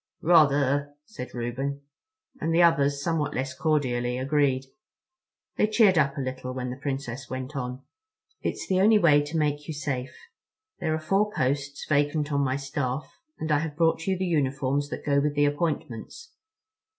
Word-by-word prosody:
"Rather," 145 -3 +4
said 140 -11 -8
Reuben, 130 +4 -3 0.6
and 165 - -1
the 170 +1 +5
others, 145 -4 +3
somewhat 160 -3 -1
less 130 +1 -2
cordially, 125 -5 0
agreed. 135 -1 +1 0.9
They - - +3
cheered 210 -5 +4
up 140 -2 +1
a - - -1
little 130 0 -5
when 125 -1 -3
the - - -5
Princess 135 -2 -4
went 130 +3 -5
on. 125 0 -4 0.6
"It's - - -3
the 185 -1 +2
only 215 +2 +6
way 155 -7 +5
to 150 +3 -4
make 145 -1 0
you 160 - -4
safe. 135 -3 -4 0.6
There 160 -2 0
are - - -2
four 195 +6 +1
posts 140 -2 -2
vacant 145 0 +1
on 140 0 +2
my 130 -1 +1
staff, 135 0 -3 0.2
and 155 0 -3
I 150 - +4
have 155 -1 -4
brought 165 0 +2
you 190 -1 +1
the 190 - -1
uniforms 140 -3 0
that - - -6
go 140 -1 +3
with 145 +1 0
the 145 0 +4
appointments." 145 - -3
145 Hz, 170 wpm, -26 LUFS, 135-155 Hz, 0.9 s, only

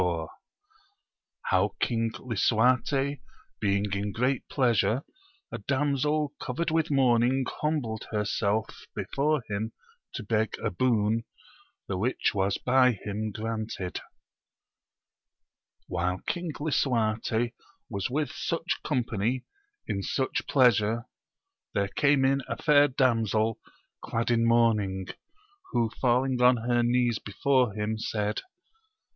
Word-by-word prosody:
— 410 -1 -39
How - - +2
King 115 -1 +1
Lisuarte 125 +4 +1 0.4
being 100 -1 0
in 100 +1 -2
great 125 +5 -1
pleasure 120 -1 +2 0.5
a - - -4
damsel 145 +1 0
covered 155 +6 -2
with 160 0 +1
mourning 130 -1 +3 0.2
humbled 140 -8 -1
herself 105 0 -1
before 145 -1 0
him 110 +2 -3 0.4
to - - -4
beg 110 0 0
a - - -2
boon, 110 +1 +1 0.6
the 95 -2 -2
which 125 +6 +1
was 100 0 +1
by 125 0 +4
him 105 +1 -4
granted. 110 -3 -4 1.9
HILE 90 +2 -1
King 175 -1 -2
Lisuarte 120 -5 0 0.3
was 100 -1 -3
with 145 +3 -1
such 165 +1 -2
company 120 -2 -1 0.4
in 100 - -2
such 130 +6 -2
pleasure, 115 -4 +3 0.7
there 100 -1 +1
came 140 +1 +3
in 135 +1 +2
a - - -3
fair 145 -2 +5
damsel 115 -5 +1 0.4
clad 115 +1 -1
in 115 -1 +3
mourning, 105 -5 +2 0.6
who 115 -2 +1
falling 125 0 +2
on 125 0 +6
her 120 +1 +1
knees 120 -1 +2
before 125 +1 +1
him, 110 +1 -2
said. 105 -1 -2
120 Hz, 110 wpm, -28 LUFS, 110-135 Hz, 1.9 s, on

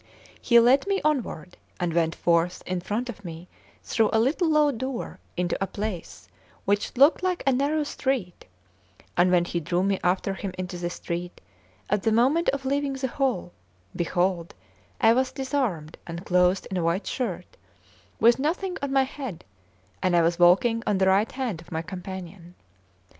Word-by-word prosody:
He 235 -1 +6
led 255 +7 +4
me 395 0 +1
onward, 225 - -1 0.2
and 175 -2 -1
went 165 -1 +1
forth 170 +1 +1
in 185 -1 -2
front 220 +7 -2
of 215 -4 -8
me 170 0 -8 0.4
through 220 -2 +1
a 220 - +3
little 310 +9 +2
low 300 -1 +4
door 260 0 -5 0.2
into 180 0 0
a - - -2
place 175 - -6 0.4
which 205 +5 0
looked 280 +5 +6
like 365 -1 -1
a 275 - +4
narrow 285 +4 +1
street; 260 -11 -3 0.7
and 175 +1 +4
when 175 -1 +4
he 175 - -2
drew 175 +3 0
me 195 -1 +1
after 185 +2 +1
him 195 -1 -5
into 180 0 -4
the 175 0 -2
street, 175 0 -5 0.5
at 205 0 +1
the 225 - +1
moment 265 +10 +3
of 275 -1 -2
leaving 280 +1 0
the 265 -1 -3
hall, 245 -10 -1 0.4
behold 175 0 -1 0.4
I 225 -3 +6
was 260 +2 +1
disarmed 255 - -2
and 170 +2 -6
clothed 180 +1 +3
in 190 - -1
a 175 - 0
white 170 +4 0
shirt, 190 -8 -4 0.6
with 235 +3 +5
nothing 355 +6 -1
on 280 -1 -2
my 270 -1 +4
head, 260 - -7 0.6
and 185 -2 +2
I 170 - +5
was 170 +1 +1
walking 195 +7 +5
on 205 - +2
the 190 0 +3
right 200 +4 +3
hand 245 -10 -3
of 170 - -17
my 160 0 -2
companion. 180 -1 -8
200 Hz, 175 wpm, -26 LUFS, 175-265 Hz, 0.7 s, He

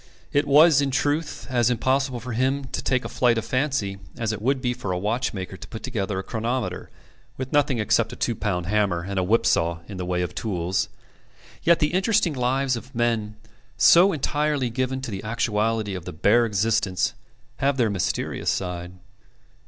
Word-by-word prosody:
It 145 +1 +2
was, 150 +1 +6
in 140 - 0
truth, 145 +4 -1
as 120 -2 +3
impossible 130 +1 0
for 125 +2 -7
him 130 +4 0
to - - -2
take 130 -1 0
a - - -1
flight 120 -2 +2
of 115 - -2
fancy 130 -8 -1 0.2
as 115 -2 -1
it 105 - -6
would 135 +4 +1
be 125 -1 -1
for 120 -6 -5
a 90 - -1
watchmaker 100 -2 -2
to - - -10
put 110 - -8
together 105 -6 -2
a 95 - -3
chronometer 115 +3 -3 0.5
with 130 0 -5
nothing 145 -3 +3
except 115 +1 +1
a - - -7
two 120 - -1
pound 90 -5 -2
hammer 100 -3 +1
and 95 +1 -2
a - - +1
whip 110 +6 +2
saw 85 0 +1
in 100 - -8
the 90 - -3
way 90 0 0
of 90 0 -4
tools. 90 -4 -1 0.7
Yet 170 0 +4
the 150 - +1
uninteresting 195 -1 +2
lives 130 0 0
of 125 +2 -9
men 115 -3 0 0.4
so 170 - +7
entirely 145 -4 0
given 130 +2 -2
to 130 - -5
the 95 -1 -5
actuality 110 -1 0
of 90 -2 -6
the - - -6
bare 110 +9 +3
existence 105 -3 +1 0.4
have 140 0 +1
their 115 -4 +2
mysterious 95 -4 -2
side. 90 -1 -3
115 Hz, 190 wpm, -24 LUFS, 100-130 Hz, 0.7 s, so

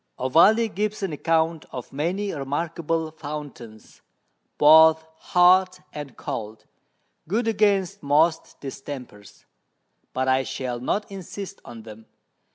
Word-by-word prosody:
Ovalle 195 - +4
gives 210 +1 -2
an 185 -5 -2
Account 160 +1 0
of 125 0 -8
many 180 +8 -2
remarkable 160 +3 -3
Fountains, 145 -8 -9 0.6
both 160 +1 +7
hot 185 +1 +4
and 145 -4 -8
cold, 110 0 -6 0.6
good 220 +7 -1
against 200 -3 +1
most 155 +3 +1
Distempers; 130 -6 -9 0.7
but 130 0 -2
I 130 0 +3
shall 125 -2 -4
not 200 - -2
insist 195 +1 -8
on 115 -2 -11
them. 110 0 -13
160 Hz, 110 wpm, -24 LUFS, 135-185 Hz, 0.7 s, both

